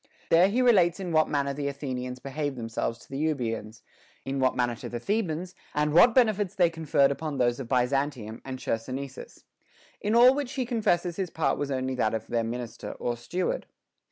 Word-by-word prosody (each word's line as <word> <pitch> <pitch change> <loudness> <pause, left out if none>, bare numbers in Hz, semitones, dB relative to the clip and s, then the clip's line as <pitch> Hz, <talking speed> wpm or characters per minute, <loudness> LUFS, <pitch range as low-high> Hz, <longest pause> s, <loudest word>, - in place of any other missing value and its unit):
There 175 +3 +6
he 250 +5 +2
relates 190 -8 +4
in 185 -3 -4
what 155 -1 +3
manner 140 -1 0
the 140 0 -3
Athenians 130 -3 -4
behaved 140 +2 -4
themselves 115 0 -3
to - - -18
the 135 - -5
Euboeans, 115 -8 -2 0.4
in 135 0 -2
what 130 -1 +2
manner 120 -1 +1
to - - -7
the 120 - -4
The 205 - 0
bans, 175 -1 -4 0.2
and 150 0 +1
what 230 +8 +7
benefits 215 -6 +3
they 175 -3 +3
conferred 150 -4 +2
upon 150 0 -4
those 120 -1 +1
of 125 -3 -6
Byzantium 125 -3 0
and 130 -1 -5
Chersonesus; 130 +3 -5 0.6
in 210 +2 0
all 245 +2 +8
which 280 -2 -3
he 260 -2 -1
confesses 180 -8 0
his 190 -3 -2
part 160 0 0
was 145 - -2
only 130 -1 -1
that 115 -3 0
of 110 0 -4
their 115 -1 -1
minister 120 0 -5
or 120 - -3
steward. 175 +10 -3
140 Hz, 195 wpm, -27 LUFS, 125-175 Hz, 0.6 s, all